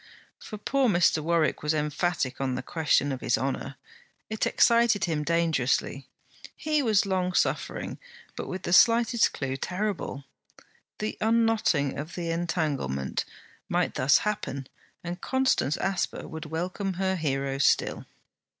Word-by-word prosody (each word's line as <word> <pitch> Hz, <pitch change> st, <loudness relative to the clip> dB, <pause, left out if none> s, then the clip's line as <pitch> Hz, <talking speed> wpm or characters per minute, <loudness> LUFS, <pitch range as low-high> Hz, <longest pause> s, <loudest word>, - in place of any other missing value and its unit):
For 215 Hz, -, -8 dB
poor 265 Hz, +4 st, +1 dB
Mr. 175 Hz, -4 st, +3 dB
Warwick 165 Hz, 0 st, +1 dB
was 150 Hz, +1 st, 0 dB
emphatic 150 Hz, -2 st, -1 dB
on 130 Hz, -2 st, -1 dB
the -, -, -4 dB
question 145 Hz, -3 st, +1 dB
of 130 Hz, -, -4 dB
his -, -, +1 dB
honour. 135 Hz, +1 st, -3 dB, 0.6 s
It 220 Hz, -, 0 dB
excited 235 Hz, -2 st, +4 dB
him 160 Hz, -4 st, -1 dB
dangerously. 150 Hz, -5 st, 0 dB, 0.5 s
He 305 Hz, -1 st, 0 dB
was 215 Hz, -6 st, +3 dB
long 185 Hz, -2 st, 0 dB
suffering, -, -, -1 dB, 0.4 s
but -, -, -5 dB
with 185 Hz, 0 st, -5 dB
the 175 Hz, -, -1 dB
slightest 230 Hz, +3 st, +5 dB
clue 135 Hz, -1 st, -3 dB
terrible. 185 Hz, -4 st, -3 dB, 0.7 s
The 215 Hz, +1 st, -4 dB
unknotting 220 Hz, -12 st, +2 dB
of 155 Hz, +3 st, -6 dB
the 170 Hz, -2 st, -3 dB
entanglement 155 Hz, -, -2 dB, 0.4 s
might -, -, 0 dB
thus 135 Hz, +2 st, +4 dB
happen 200 Hz, -10 st, -3 dB, 0.4 s
and 175 Hz, +1 st, -5 dB
Constance 260 Hz, -, +1 dB
Asper 195 Hz, -1 st, -2 dB
would 160 Hz, 0 st, -7 dB
welcome 180 Hz, +5 st, -3 dB
her 190 Hz, +1 st, 0 dB
hero 135 Hz, -4 st, -2 dB
still. 135 Hz, -, +1 dB
170 Hz, 135 wpm, -27 LUFS, 145-205 Hz, 0.7 s, slightest